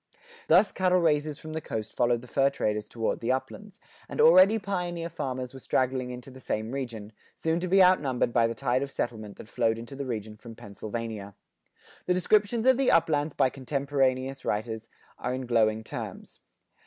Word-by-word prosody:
Thus 215 - +5
cattle 185 -1 +2
raisers 150 -3 +1
from 155 0 -9
the 160 - -3
coast 110 -6 -5
followed 120 -1 +2
the 125 - -13
fur 135 +2 +2
traders 105 -6 -2
toward 115 -2 -2
the 120 +2 0
uplands, 160 +10 -5 0.3
and - - -7
already 185 +6 +7
pioneer 180 -5 -3
farmers 130 -5 -4
were 135 - -9
straggling 130 0 0
into 125 +1 -8
the 130 - -12
same 110 -2 -3
region, 120 -6 -5 0.2
soon 160 +1 0
to 180 - -3
be 190 +1 +6
outnumbered 135 -10 +2
by 115 -1 +4
the 115 - -4
tide 125 +1 0
of 140 - -3
settlement 110 -6 -4
that - - -11
flowed 115 0 0
into 115 +4 -9
the 140 -1 -5
region 110 -3 -5
from 115 0 -11
Pennsylvania. 105 -1 -6 0.7
The 180 - +3
descriptions 210 +5 +2
of 260 -1 +5
the 270 -1 +2
uplands 155 -2 +2
by 130 - +3
contemporaneous 135 -1 -1
writers 110 +1 -3 0.3
are 125 +1 -2
in 130 0 -5
glowing 110 -2 +2
terms. - - -8
130 Hz, 180 wpm, -27 LUFS, 115-160 Hz, 0.7 s, already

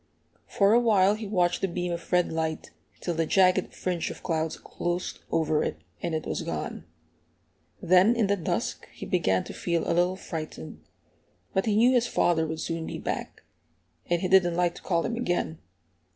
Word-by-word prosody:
For 200 +1 +3
a 235 - +6
while 205 -4 +4
he 215 0 -5
watched 175 -3 +1
the 195 - +1
beam 180 0 -3
of 170 - -7
red 180 -1 +3
light, 160 -1 -3 0.3
till 175 - -2
the 165 -1 0
jagged 185 0 +3
fringe 180 -3 -2
of - - -9
clouds 160 -2 -1
closed 175 +1 -4
over 155 -2 +2
it, - - -3 0.2
and 165 - -2
it 155 - -3
was - - -2
gone. - - -5 1.0
Then, 185 +6 +5
in 230 -3 +2
the 200 +1 +2
dusk, 175 - -3
he - - -8
began 95 -1 +1
to - - -8
feel 170 -2 -1
a - - +1
little 175 +2 +2
frightened; 155 - -7 0.7
but 190 +3 0
he 210 - +2
knew 235 +4 +5
his 245 -1 +3
father 160 -2 +2
would 160 0 -4
soon 165 -1 -3
be - - -5
back, - - -5 0.7
and 175 +1 +1
he - - +2
didn't 180 -2 +4
like 175 -1 +2
to - - -12
call 170 -3 0
him 235 - -2
again. 175 -8 -1
175 Hz, 190 wpm, -27 LUFS, 165-195 Hz, 1.0 s, a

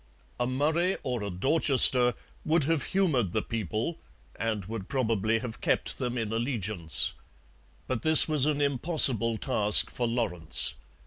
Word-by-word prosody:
A 120 - -2
Murray 155 +8 -2
or 125 -3 -5
a 100 - -6
Dorchester 125 - +1 0.3
would 160 0 0
have 160 +1 -2
humoured 145 - -2
the - - -3
people 115 - -6 0.4
and 110 -4 -5
would 105 -1 -9
probably 115 -4 -2
have 115 -1 -9
kept - - -3
them 125 0 -5
in 110 -2 -5
allegiance. 105 - -2 0.7
But 130 +3 -5
this 160 0 +9
was 150 -3 0
an 145 -1 -2
impossible 130 -5 +4
task 105 -5 +4
for 120 - -4
Lawrence. 110 -9 0
120 Hz, 140 wpm, -26 LUFS, 110-145 Hz, 0.7 s, this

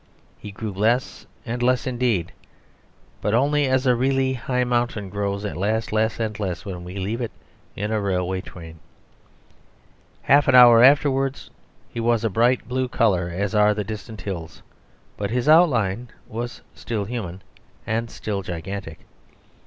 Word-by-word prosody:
He 105 - -8
grew 105 +2 -5
less 110 +6 0 0.2
and 120 +1 -4
less 125 +3 +2
indeed; 120 -9 0 0.9
but 105 +2 +1
only 145 +3 +2
as 130 0 +1
a 125 - +5
really 130 +1 +1
high 125 0 -1
mountain 120 -5 -1
grows 100 0 -2
at 105 - -4
last 110 +4 -1
less 110 +1 +1
and 110 -2 -3
less 95 -2 -3
when 90 -3 -6
we 90 +2 -9
leave 100 +5 -3
it 120 - -2 0.5
in 105 +2 -3
a 110 -1 0
railway 95 -1 -1
train. 80 -3 -11 1.4
Half 140 +1 +4
an - - +5
hour 120 -2 +9
afterwards 135 0 +3 0.4
he - - -7
was 115 0 +1
a 115 - 0
bright 120 +5 +2
blue 130 +1 -1
colour, 100 -8 +1
as 95 +4 -3
are 105 0 +4
the 105 - -2
distant 110 +1 -7
hills; 85 -5 -7 0.5
but 100 -1 -3
his 125 +4 -1
outline 125 - +4 0.2
was 120 +2 -6
still 110 -4 -4
human 95 -5 -6 0.4
and 115 +1 -2
still 100 -3 -4
gigantic. 90 -1 -6
110 Hz, 155 wpm, -23 LUFS, 100-125 Hz, 1.4 s, hour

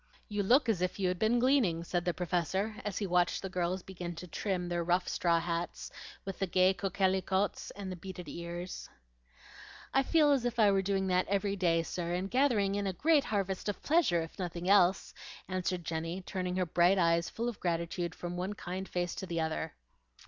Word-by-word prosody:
"You 205 -1 -1
look 250 +7 +4
as 210 -6 +1
if 180 0 -1
you 190 -2 +1
had 180 -1 -2
been 220 +3 +3
gleaning," 240 -10 +3
said 175 0 -2
the 175 - +1
Professor, 185 +4 -1
as 205 -3 -3
he 205 - -1
watched 180 0 +1
the 190 - -3
girls 180 0 -1
begin 175 -2 -6
to 170 - -7
trim 180 0 -2
their 175 -1 -1
rough 180 +2 +1
straw 170 -1 +2
hats 170 0 -3 0.3
with 195 -2 -5
the 195 - 0
gay 185 +1 +4
coquelicots 190 0 0
and 195 -2 -6
the - - -4
bearded 180 -1 -8
ears. 170 +3 -6 1.0
"I 270 - +5
feel 300 +1 +4
as 275 -4 +3
if 240 -1 -2
I 210 -3 +6
were 195 -1 +3
doing 195 0 0
that 180 0 +2
every 200 0 0
day, 170 -3 +2
sir, 175 +1 -3
and 190 +2 -3
gathering 240 -7 +3
in 200 0 -1
a 190 - -1
great 300 - +3
harvest 195 -1 -1
of 205 - -5
pleasure, 290 - +3
if 165 - -11
nothing 175 -1 -4
else," 190 -1 +4 0.3
answered 180 -1 -2
Jenny, 165 +3 -3
turning 180 -1 -3
her 185 -1 +1
bright 175 +3 +3
eyes 170 -1 +2
full 235 +1 -3
of 240 -3 -4
gratitude 170 0 -2
from 175 0 -5
one 185 +3 -2
kind 190 0 -5
face 175 -1 -1
to 190 - -6
the 170 -2 -2
other. 160 0 -2
185 Hz, 205 wpm, -32 LUFS, 175-200 Hz, 1.0 s, I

